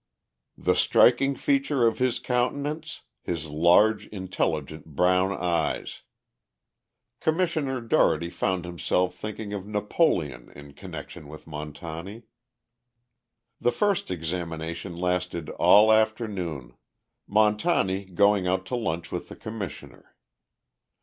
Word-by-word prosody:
The -, -, +2 dB
striking 135 Hz, +3 st, +4 dB
feature 140 Hz, -2 st, +1 dB
of 115 Hz, -, +1 dB
his 130 Hz, -1 st, +2 dB
countenance, 145 Hz, +5 st, -2 dB, 0.2 s
his 80 Hz, -3 st, -4 dB
large, 90 Hz, +8 st, +4 dB
intelligent 80 Hz, -6 st, -3 dB
brown 90 Hz, +3 st, +3 dB
eyes. 85 Hz, -4 st, -2 dB, 1.2 s
Commissioner 155 Hz, -6 st, 0 dB
Dougherty 85 Hz, -7 st, +2 dB
found 95 Hz, -2 st, -1 dB
himself 90 Hz, +1 st, 0 dB
thinking 105 Hz, 0 st, -6 dB
of 100 Hz, -1 st, -5 dB
Napoleon 105 Hz, -, 0 dB
in 70 Hz, -1 st, -12 dB
connection 80 Hz, -3 st, -9 dB
with 75 Hz, +1 st, -11 dB
Montani. 80 Hz, +7 st, -7 dB, 1.4 s
The 120 Hz, -, +2 dB
first 205 Hz, +3 st, 0 dB
examination 85 Hz, 0 st, -4 dB
lasted 90 Hz, -2 st, -2 dB
all 110 Hz, +2 st, +6 dB
afternoon, 100 Hz, -, -1 dB, 0.6 s
Montani 105 Hz, -, +2 dB
going 100 Hz, +1 st, +2 dB
out 95 Hz, +1 st, 0 dB
to 125 Hz, -, -3 dB
lunch 85 Hz, -8 st, -3 dB
with -, -, -5 dB
the -, -, -9 dB
Commissioner. 110 Hz, -6 st, -8 dB
95 Hz, 105 wpm, -26 LUFS, 85-115 Hz, 1.4 s, all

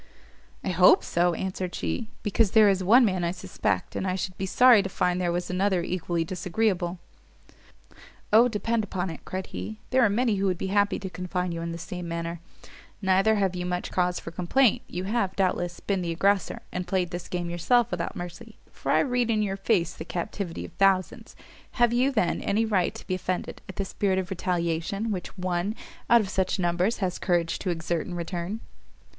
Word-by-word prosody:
"I -, -, -2 dB
hope 180 Hz, 0 st, +6 dB
so," 175 Hz, 0 st, +1 dB
answered 185 Hz, 0 st, -3 dB
she, 225 Hz, -3 st, -3 dB
"because 210 Hz, 0 st, +2 dB
there 215 Hz, -1 st, +8 dB
is 190 Hz, -1 st, +1 dB
one 235 Hz, +7 st, +6 dB
man 185 Hz, -4 st, 0 dB
I 170 Hz, -, +1 dB
suspect, 185 Hz, +1 st, -2 dB
and 190 Hz, -, -2 dB
I 185 Hz, -, 0 dB
should 185 Hz, -1 st, -4 dB
be 190 Hz, -, -3 dB
sorry 245 Hz, +1 st, +6 dB
to 195 Hz, -, -4 dB
find 180 Hz, 0 st, 0 dB
there 175 Hz, -1 st, +1 dB
was 175 Hz, +1 st, -2 dB
another 185 Hz, -1 st, +1 dB
equally 175 Hz, -1 st, -1 dB
disagreeable." 180 Hz, 0 st, -1 dB, 1.4 s
"O, 230 Hz, +3 st, +7 dB
depend 230 Hz, 0 st, -1 dB
upon 190 Hz, -3 st, -3 dB
it," 160 Hz, -, -10 dB
cried 185 Hz, 0 st, -4 dB
he, 95 Hz, +4 st, -5 dB
"there 260 Hz, 0 st, +4 dB
are 220 Hz, -, +5 dB
many 225 Hz, 0 st, +1 dB
who 195 Hz, +1 st, +1 dB
would 185 Hz, -2 st, 0 dB
be 190 Hz, +2 st, -3 dB
happy 205 Hz, 0 st, +3 dB
to 195 Hz, -, -5 dB
confine 180 Hz, 0 st, -3 dB
you 165 Hz, 0 st, -4 dB
in 170 Hz, 0 st, -3 dB
the 165 Hz, -, -5 dB
same 180 Hz, +1 st, -6 dB
manner; 170 Hz, 0 st, -4 dB, 0.6 s
neither 195 Hz, +2 st, +3 dB
have 195 Hz, -3 st, +1 dB
you 180 Hz, -, -3 dB
much 180 Hz, 0 st, -3 dB
cause 180 Hz, -1 st, +1 dB
for 165 Hz, -, -8 dB
complaint; 195 Hz, +9 st, +2 dB
you 180 Hz, -, -4 dB
have, 195 Hz, -1 st, -1 dB
doubtless, 175 Hz, -2 st, 0 dB
been 195 Hz, -2 st, -1 dB
the 175 Hz, -, -3 dB
aggressor, 195 Hz, +4 st, +1 dB
and 180 Hz, 0 st, -4 dB
played 185 Hz, -3 st, 0 dB
this 175 Hz, -1 st, -5 dB
game 175 Hz, -1 st, -3 dB
yourself 240 Hz, +8 st, +2 dB
without -, -, -3 dB
mercy, 175 Hz, -1 st, -8 dB
for -, -, -3 dB
I -, -, +5 dB
read 245 Hz, -3 st, 0 dB
in 215 Hz, -2 st, +2 dB
your 195 Hz, -2 st, -1 dB
face 195 Hz, -4 st, +1 dB
the -, -, -7 dB
captivity 175 Hz, +1 st, -4 dB
of -, -, -11 dB
thousands: 195 Hz, -2 st, +1 dB, 0.4 s
have 240 Hz, -1 st, +3 dB
you, 255 Hz, +3 st, +3 dB
then, 220 Hz, -9 st, 0 dB
any 220 Hz, +3 st, +1 dB
right 195 Hz, -5 st, +1 dB
to -, -, -10 dB
be -, -, -2 dB
offended 185 Hz, 0 st, -3 dB
at 190 Hz, -, -7 dB
the 195 Hz, -, -2 dB
spirit 190 Hz, 0 st, 0 dB
of 185 Hz, -1 st, -2 dB
retaliation 180 Hz, +4 st, -1 dB
which 190 Hz, 0 st, -5 dB
one, 180 Hz, +3 st, -1 dB, 0.3 s
out 235 Hz, 0 st, +7 dB
of 200 Hz, -, -4 dB
such 190 Hz, -1 st, 0 dB
numbers 180 Hz, +4 st, +1 dB
has 180 Hz, -, -3 dB
courage 170 Hz, -3 st, 0 dB
to -, -, -3 dB
exert 170 Hz, -1 st, -2 dB
in 175 Hz, -, -5 dB
return?" 175 Hz, +5 st, -4 dB
185 Hz, 205 wpm, -26 LUFS, 175-205 Hz, 1.4 s, there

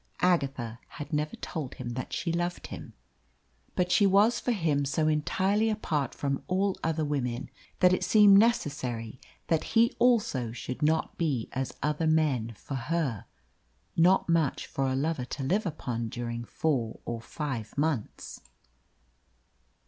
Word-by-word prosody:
Agatha 135 Hz, -10 st, +1 dB
had 150 Hz, +2 st, -8 dB
never 150 Hz, +1 st, -1 dB
told 150 Hz, -6 st, -5 dB
him 125 Hz, -1 st, -6 dB
that 125 Hz, +2 st, -5 dB
she 170 Hz, -1 st, -2 dB
loved 175 Hz, +1 st, -2 dB
him. -, -, -8 dB, 0.8 s
But 180 Hz, -1 st, +1 dB
she 200 Hz, +1 st, +5 dB
was 205 Hz, +5 st, +4 dB
for 250 Hz, -, -1 dB
him 160 Hz, -9 st, +1 dB
so 150 Hz, +3 st, 0 dB
entirely 190 Hz, +8 st, +1 dB
apart 155 Hz, -, -1 dB
from 140 Hz, -1 st, -2 dB
all 190 Hz, +1 st, +1 dB
other 160 Hz, -1 st, 0 dB
women 125 Hz, -5 st, -2 dB, 0.3 s
that 180 Hz, -1 st, +6 dB
it -, -, 0 dB
seemed 205 Hz, -2 st, +7 dB
necessary 130 Hz, -, 0 dB, 0.2 s
that 165 Hz, -2 st, +1 dB
he 230 Hz, +1 st, +5 dB
also 210 Hz, -, +2 dB
should 125 Hz, +1 st, -6 dB
not 155 Hz, +2 st, +1 dB
be 140 Hz, -9 st, 0 dB
as 130 Hz, 0 st, -4 dB
other 150 Hz, +2 st, 0 dB
men 140 Hz, -8 st, +1 dB
for 140 Hz, -, -9 dB
her. 135 Hz, -, -1 dB, 0.7 s
Not 180 Hz, +3 st, +4 dB
much 165 Hz, -5 st, +1 dB
for 135 Hz, -1 st, -2 dB
a 130 Hz, -, 0 dB
lover 140 Hz, -1 st, -1 dB
to 135 Hz, +2 st, -5 dB
live 190 Hz, +9 st, +1 dB
upon 120 Hz, -8 st, -3 dB
during 120 Hz, 0 st, -4 dB
four 125 Hz, -5 st, -1 dB
or 115 Hz, -1 st, -4 dB
five 130 Hz, -4 st, -5 dB
months! 145 Hz, -7 st, -2 dB
150 Hz, 150 wpm, -29 LUFS, 130-175 Hz, 0.8 s, seemed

